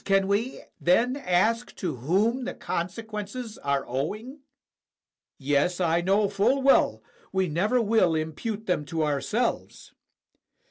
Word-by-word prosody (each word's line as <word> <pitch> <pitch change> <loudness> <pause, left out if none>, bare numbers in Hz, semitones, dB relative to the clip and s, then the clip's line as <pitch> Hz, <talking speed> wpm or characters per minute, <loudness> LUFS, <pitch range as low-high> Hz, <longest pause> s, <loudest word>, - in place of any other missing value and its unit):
can 195 -1 +2
we 215 +6 -1 0.2
then 235 +9 +3
ask 230 0 +1
to 165 -9 -3
whom 205 - +1
the - - -4
con 170 +1 -2
sequences 220 +2 -7
are 140 -1 -1
owing? 215 - -4 1.0
Yes, 145 +6 +1
I 170 -1 +2
know 200 +3 +2
full 205 +8 +1
well 275 - +4 0.3
we 190 -1 +1
never 200 +10 +1
will 215 -7 +3
impute 180 +8 -3
them 180 -5 0
to 160 +1 -2
ourselves. 155 - -2
195 Hz, 130 wpm, -26 LUFS, 165-225 Hz, 1.0 s, well